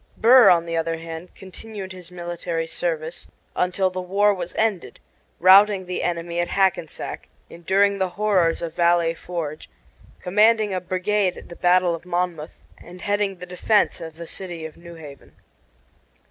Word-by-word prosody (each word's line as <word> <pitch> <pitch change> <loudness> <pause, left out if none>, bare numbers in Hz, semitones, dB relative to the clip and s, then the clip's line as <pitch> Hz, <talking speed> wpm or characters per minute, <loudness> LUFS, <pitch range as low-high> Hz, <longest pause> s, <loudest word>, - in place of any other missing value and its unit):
Burr, 245 +2 +7
on 170 -1 +4
the 165 0 -4
other 165 0 -1
hand, 165 +1 -9
continued 195 0 -9
his 180 -2 -10
military 175 -1 -4
service 165 0 -4 0.3
until 185 +1 0
the 185 0 -4
war 200 +3 +2
was 180 -2 -6
ended, 215 -5 -1 0.4
routing 190 +2 +6
the 180 0 -4
enemy 170 0 -2
at 175 - 0
Hackensack, 190 -5 -1 0.2
enduring 195 +4 +1
the 190 -1 0
horrors 185 -4 +1
of 165 -1 -4
Valley 170 -1 +2
Forge, 160 -3 -6 0.5
commanding 215 +2 +3
a 185 - -2
brigade 185 +1 -1
at - - -12
the 170 - -9
battle 180 0 +3
of 165 - -6
Monmouth, 175 -3 -3 0.2
and 180 +1 -13
heading 205 -1 0
the 180 0 -9
defense 180 +2 +1
of 160 -1 -8
the 170 +1 -8
city 175 -2 -7
of 160 - -9
New 170 0 -12
Haven. 145 -4 -13
180 Hz, 160 wpm, -23 LUFS, 170-195 Hz, 0.5 s, Burr